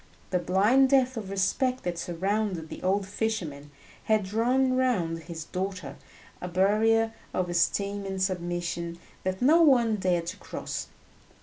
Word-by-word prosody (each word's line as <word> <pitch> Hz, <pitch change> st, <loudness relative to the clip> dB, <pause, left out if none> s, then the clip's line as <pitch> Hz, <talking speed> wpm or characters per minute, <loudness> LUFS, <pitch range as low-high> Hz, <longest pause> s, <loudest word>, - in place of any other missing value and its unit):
The 180 Hz, -, +2 dB
blind 205 Hz, +10 st, +4 dB
depth 260 Hz, -1 st, +3 dB
of 210 Hz, -4 st, -5 dB
respect 250 Hz, +7 st, 0 dB
that 175 Hz, -1 st, -2 dB
surrounded 185 Hz, -1 st, -2 dB
the -, -, -8 dB
old 195 Hz, +2 st, +1 dB
fisherman 185 Hz, -9 st, -3 dB, 0.4 s
had 215 Hz, -1 st, +2 dB
drawn 245 Hz, +7 st, +1 dB
around 230 Hz, -11 st, +1 dB
his 165 Hz, -1 st, -7 dB
daughter 185 Hz, -5 st, -4 dB, 0.5 s
a 180 Hz, -, -4 dB
barrier 220 Hz, +5 st, +2 dB, 0.2 s
of 180 Hz, -1 st, 0 dB
esteem 200 Hz, +3 st, 0 dB
and 190 Hz, 0 st, -4 dB
submission 175 Hz, -2 st, -2 dB, 0.3 s
that 185 Hz, +3 st, -2 dB
no 320 Hz, +6 st, +6 dB
one 240 Hz, -8 st, +4 dB
dared 180 Hz, -3 st, 0 dB
to 170 Hz, -, -5 dB
cross. -, -, -5 dB
195 Hz, 140 wpm, -27 LUFS, 175-225 Hz, 0.5 s, no